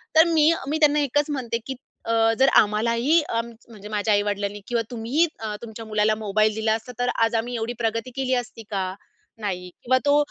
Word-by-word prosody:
तर 320 - +9
मी, 315 0 +5 0.2
मी 300 +3 0
त्यांना 300 -1 +4
एकच 290 +1 +1
म्हणते 255 -5 -2
की 265 - -4 0.3
अ, 225 0 +3
"जर 270 - +6
आम्हालाही 230 +9 +2
अ, 230 - +1 0.3
म्हणजे 210 -2 -11
माझ्या 210 0 +1
आई-वडिलांनी 205 0 -1
किंवा 235 -1 0
तुम्हीही 245 +8 +1
अ, 215 -1 -4
तुमच्या 225 -1 -8
मुलाला 215 0 +1
मोबाईल 215 +1 +2
दिला 220 0 +1
असता 225 +2 -7
तर 245 0 +1
आज 230 0 +2
आम्ही 240 +2 -1
एवढी 230 +1 -2
प्रगती 230 +2 -1
केली 265 -1 -1
असती 225 0 -13
का?" 190 -2 -2 0.5
नाही 180 -3 -3
किंवा 260 +1 +3
तो 285 0 +5
230 Hz, 190 wpm, -24 LUFS, 215-260 Hz, 0.5 s, तर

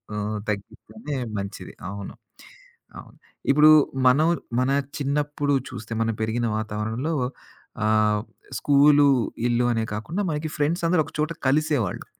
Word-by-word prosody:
ఆహ్, 105 +1 -2
తగ్గిస్తేనే 110 - -6 0.2
మంచిది. 100 0 -6 0.2
అవును. 100 0 -7 0.9
అవును. - - -14 0.3
ఇప్పుడు 150 +2 +7 0.4
మనం 150 +5 +4 0.3
మన, 130 +1 +1 0.3
చిన్నప్పుడు 145 0 -1 0.2
చూస్తే 115 - -7
మనం 115 0 +1
పెరిగిన 115 +2 -1
వాతావరణంలో 110 +7 -3 0.7
ఆహ్, 105 -1 +2 0.4
స్కూలు, 145 0 +5 0.4
ఇల్లు 120 0 +1
అనే 115 -1 0
కాకుండా 155 - -3
మనకి 155 +1 -3
ఫ్రెండ్సందరూ 165 +3 +1
ఒక - - -12
చోట 155 +2 0 0.2
కలిసేవాళ్ళు. 145 - 0
135 Hz, 115 wpm, -24 LUFS, 110-150 Hz, 0.9 s, ఇప్పుడు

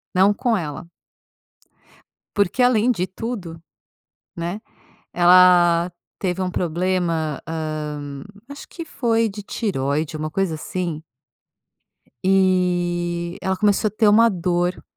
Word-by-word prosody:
Não 195 +2 +5
com 235 -1 0
ela. 155 -1 -5 1.5
Porque 205 +5 +2
além 245 -1 +3
de 185 -6 0
tudo, 185 -6 -6 0.8
né, 175 +5 -4 0.5
ela 175 -1 +5 0.3
teve 185 -1 -2
um 185 - -1
problema, 170 -3 -1
hã, 150 -3 -5 0.2
acho 285 0 -10
que 335 - -8
foi 230 -6 0
de 205 +1 -8
tireoide, 155 - -2
uma 155 0 -4
coisa 190 -1 -1
assim 165 0 -4 1.2
e, 175 -2 +1
ela 190 0 -1
começou 210 +1 +2
ter 215 +1 +2
uma 225 +3 +6
dor. 180 -1 -1
180 Hz, 110 wpm, -21 LUFS, 165-200 Hz, 1.5 s, uma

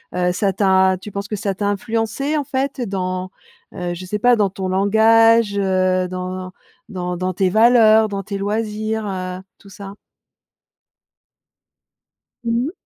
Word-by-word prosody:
heu, 180 0 +1
ça 195 +2 0
t'a 190 -1 +3
tu 210 - -9
penses 200 +1 -5
que 210 - -4
ça 200 -1 -2
t'a 205 +2 -4
influencée, 225 +7 -2
en 290 - -2
fait, 270 +1 -3
dans, 185 -3 -3 0.4
heu, 175 -1 -4
je 185 +2 -8
sais 210 +3 -3
pas 245 +1 +4
dans 200 -2 +2
ton 190 0 -5
langage, 220 +2 +4
heu, 185 -1 +1
dans 185 0 -6 0.4
dans 180 -2 -4
dans 185 +1 -2
tes 185 +1 +1
valeurs, 220 0 +5
dans 200 -1 -5
tes 200 0 -5
loisirs, 215 +1 -2
heu, 185 -1 -4 0.2
tout 200 - -17
ça? 195 +1 -10 2.5
Mmh 235 +2 0
mh. - - -5
200 Hz, 155 wpm, -19 LUFS, 185-220 Hz, 2.5 s, valeurs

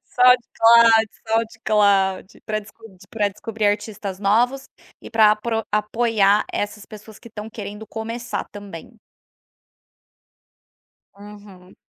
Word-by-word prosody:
SoundCloud, 235 -2 +5 0.2
SoundCloud 210 -4 +1 0.2
para 215 -1 -1
descud 215 -1 -16
pra 210 -2 0
descobrir 210 +2 -4
artistas 205 -2 -3
novos 240 +7 +1 0.3
e - - -11
pra 220 -2 +5
apro 225 +1 -3
apoiar 210 -1 +1
essas 210 0 -4
pessoas 215 0 -13
que 235 - -14
estão 215 -1 -8
querendo 210 0 -8
começar 230 +2 -5
também. 205 +1 -11 2.2
Uhum. 200 -2 -15
215 Hz, 100 wpm, -21 LUFS, 205-225 Hz, 2.2 s, SoundCloud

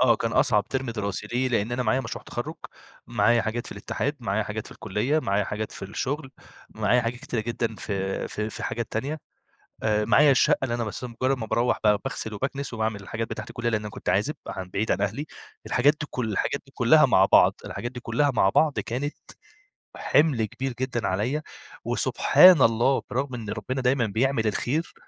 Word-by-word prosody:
آه، 120 -3 +5
كان 115 +1 -2
أصعب 105 -6 +3
ترم 130 -2 -2
دراسي 105 -2 -3
ليه؟ 125 +4 0
لأن 115 -1 0
أنا 125 +1 0
معايا 120 +3 +1
مشروع - - -6
تخرُّج، - - -5 0.5
معايا 120 0 +3
حاجات 115 +2 -3
في - - -7
الاتحاد، - - -3
معايا - - 0
حاجات - - -5
في - - -11
الكُلّية، 120 +11 -1
معايا 100 -7 0
حاجات 105 +2 -4
في - - -9
الشغل، 135 +8 -3 0.4
معايا 125 - +2
حاجات 115 +1 -3
كتيرة 115 - -3
جدًا 115 0 -2
في 95 -2 -3
في 105 +1 -3
في - - -7
حاجات 115 -1 -3
تانية 140 +7 -3 0.6
آآ، 105 -1 +2
معايا 140 +5 +5
الشقة 130 - +4
اللي 125 -3 -1
أنا 120 - -2
بس 110 +3 -5
مجرد 130 +3 -1
ما 110 - -4
باروَّح 120 +3 +1
ب 105 -1 +5
باغسل 110 - -4
وباكنس 135 +5 -4
وباعمل 110 -2 -2
الحاجات 115 +3 -4
بتاعة 110 - -5
الكُلّية، 120 0 -2
لأن 110 -2 0
أنا 105 - -6
كنت - - -5
عازب - - +1
عن 95 -1 -6
بعيد 105 +4 -1
عن - - 0
أهلي 105 +9 -2 0.4
الحاجات 140 +4 +3
دي - - -3
كل 115 -4 -3
الحاجات - - -1
دي - - -20
كُلَّها - - +6
مع - - +5
بعض - - +5
الحاجات 120 - -5
دي 125 - -7
كُلَّها 135 +5 +1
مع 95 -4 +4
بعض، 150 +7 +2
كانت 135 +5 -3 0.8
حِمل 145 -8 +2
كبير 130 +5 -4
جدًا 125 -3 -1
عليَّ 115 +11 -1 0.4
وسبحان 180 -5 +5
الله 120 +3 +3
برغم 130 +1 -2
إن 110 -4 -6
ربنا 130 +5 -3
دايمًا 125 -1 +2
بيعمل 115 +2 +1
الخير 145 +9 -1
120 Hz, 195 wpm, -25 LUFS, 110-130 Hz, 0.8 s, كُلَّها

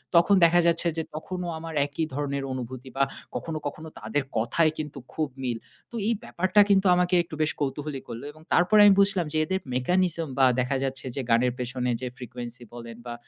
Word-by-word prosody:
তখন 175 +4 +6
দেখা 175 +1 +5
যাচ্ছে 170 0 +2
যে, 160 - 0
তখনো 180 +3 -5
আমার 165 0 -7
একই 145 +3 -2
ধরনের 140 -1 -2
অনুভূতি 130 +1 -6
বা 135 - +4 0.3
কখনো, 160 -1 -3
কখনো 155 +2 -7
তাদের 145 -1 -1
কথায় 155 +8 +2
কিন্তু 150 -2 -5
খুব 155 -1 -1 0.2
মিল। 120 -2 -1 0.3
তো - - -9
এই 230 - +3
ব্যাপারটা 185 +2 +3
কিন্তু 195 0 +4
আমাকে 180 0 +2
একটু 160 - -9
বেশ 155 - +2
কৌতূহলী 145 0 -3
করলো। 115 +2 -7
এবং 155 +1 -18
তারপর 180 +5 +4
আমি 205 -1 +8
বুঝলাম 195 -4 +3
যে, 155 - +1
এদের 190 +3 -1
mechanism 170 +5 +1
বা 135 - +7
দেখা 130 +2 +1
যাচ্ছে 135 0 -3
যে 135 - -1
গানের 120 +1 +3
পেছনে 125 0 -2
যে 125 - -3
frequency 120 -1 -8
বলেন 115 -1 -9
বা, 120 - -5
150 Hz, 195 wpm, -26 LUFS, 125-175 Hz, 0.3 s, আমি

